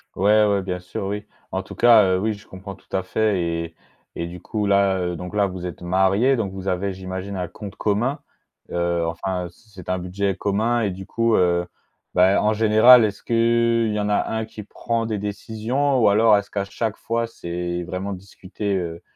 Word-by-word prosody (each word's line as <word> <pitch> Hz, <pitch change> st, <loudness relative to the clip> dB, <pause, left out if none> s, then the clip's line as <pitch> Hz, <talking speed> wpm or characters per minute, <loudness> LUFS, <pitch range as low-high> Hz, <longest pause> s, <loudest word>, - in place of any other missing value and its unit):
Ouais, 105 Hz, +3 st, +4 dB
ouais, 100 Hz, -1 st, +2 dB
bien 90 Hz, -1 st, -4 dB
sûr, 90 Hz, +2 st, -6 dB
oui. 105 Hz, +1 st, -4 dB, 0.3 s
En -, -, -2 dB
tout -, -, -10 dB
cas 115 Hz, -3 st, +6 dB
heu, 95 Hz, -1 st, +2 dB
oui, 110 Hz, +2 st, 0 dB
je 105 Hz, +2 st, -13 dB
comprends 95 Hz, +1 st, -9 dB
tout 95 Hz, -, -9 dB
à 95 Hz, -, +1 dB
fait 100 Hz, +1 st, 0 dB
et 85 Hz, -1 st, -3 dB, 0.4 s
et 85 Hz, -, -3 dB
du 90 Hz, +1 st, -9 dB
coup, 105 Hz, +2 st, -3 dB
là, 100 Hz, -1 st, +3 dB
heu, 90 Hz, -1 st, -2 dB
donc 90 Hz, +4 st, -7 dB
là, 100 Hz, -1 st, +3 dB
vous 90 Hz, -1 st, -7 dB
êtes 90 Hz, -, -7 dB
mariés, 95 Hz, +9 st, +2 dB
donc 105 Hz, -5 st, -2 dB
vous 95 Hz, 0 st, -7 dB
avez, 95 Hz, +1 st, -1 dB
j'imagine, 95 Hz, +1 st, -6 dB
un 90 Hz, -1 st, -3 dB
compte 105 Hz, +1 st, -9 dB
commun, 115 Hz, +7 st, 0 dB, 0.5 s
heu, 85 Hz, -1 st, 0 dB
enfin, 90 Hz, +2 st, -3 dB
heu, -, -, -7 dB
c'est 110 Hz, +5 st, -24 dB
c'est 95 Hz, -2 st, -11 dB
un 90 Hz, -, +1 dB
budget 95 Hz, +2 st, -2 dB
commun 110 Hz, +4 st, 0 dB
et 105 Hz, -, 0 dB
du 95 Hz, +1 st, -9 dB
coup, 115 Hz, 0 st, +1 dB
heu, 85 Hz, -1 st, +2 dB, 0.5 s
bah, 95 Hz, +3 st, +4 dB
en 110 Hz, -, +3 dB
général, 110 Hz, +2 st, +7 dB
est-ce 100 Hz, -1 st, -5 dB
qu'il 115 Hz, -1 st, +2 dB
y 105 Hz, -, -1 dB
en 105 Hz, -, -1 dB
a 105 Hz, -, +2 dB
un 110 Hz, 0 st, -2 dB
qui 110 Hz, -1 st, -10 dB
prend 115 Hz, +2 st, -3 dB
des 110 Hz, -2 st, -2 dB
décisions? 110 Hz, +7 st, -1 dB
Ou 110 Hz, -, +5 dB
alors, 105 Hz, 0 st, +5 dB
est-ce 100 Hz, -, -5 dB
qu'à 100 Hz, -1 st, -1 dB
chaque 110 Hz, +2 st, -3 dB
fois, 115 Hz, +1 st, -2 dB
c'est 85 Hz, -5 st, -4 dB
vraiment 95 Hz, +3 st, -4 dB
discuté, 100 Hz, +2 st, -5 dB
heu, 85 Hz, -2 st, -5 dB
100 Hz, 215 wpm, -22 LUFS, 90-110 Hz, 0.5 s, général